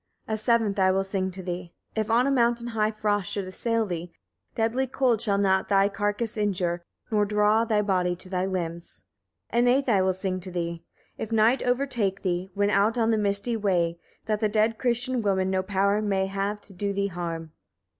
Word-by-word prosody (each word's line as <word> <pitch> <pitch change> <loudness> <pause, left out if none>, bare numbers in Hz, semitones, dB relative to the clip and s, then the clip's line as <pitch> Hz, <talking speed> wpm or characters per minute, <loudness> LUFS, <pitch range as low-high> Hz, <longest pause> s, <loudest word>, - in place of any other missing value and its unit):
12. 220 - -2
A - - -4
seventh 225 -4 +2
I 190 0 +4
will 190 +1 +2
sing 195 -1 -2
to 185 0 -8
thee. 175 -1 -5 0.2
If 220 0 -1
on 235 +3 +4
a 275 - +2
mountain 235 -2 +2
high 215 -2 +1
frost 210 -3 -1
should 200 -2 -2
assail 225 +4 0
thee, 175 -2 -5 0.4
deadly 235 +4 0
cold 250 -4 +1
shall 200 -3 +1
not 190 -1 +2
thy 200 0 +4
carcase 205 +3 -2
injure, 180 -4 0 0.3
nor 210 -1 +3
draw 210 +2 +3
thy 215 -2 +1
body 180 -3 +1
to 180 - -8
thy 185 0 -1
limbs. 170 -3 -5 0.5
13. 235 - +2
An 245 - +4
eighth 275 0 0
I 205 -6 +4
will 185 0 +2
sing 185 0 -2
to 185 +1 -7
thee. 170 -1 -4 0.4
If 220 - -4
night 225 +3 +4
overtake 245 -6 0
thee, 180 0 -1
when 205 0 +2
out 210 +4 +2
on 230 -1 +2
the 220 - +2
misty 205 +3 0
way, 175 -5 0 0.3
that 215 -1 0
the 215 -1 +1
dead 220 +1 +1
Christian 245 0 0
woman 190 -2 +1
no 190 0 +1
power 200 +2 +1
may 195 -2 +1
have 195 +2 -2
to 200 - -11
do 200 +2 -2
thee 200 0 0
harm. 165 -3 -4
200 Hz, 205 wpm, -26 LUFS, 185-225 Hz, 0.5 s, I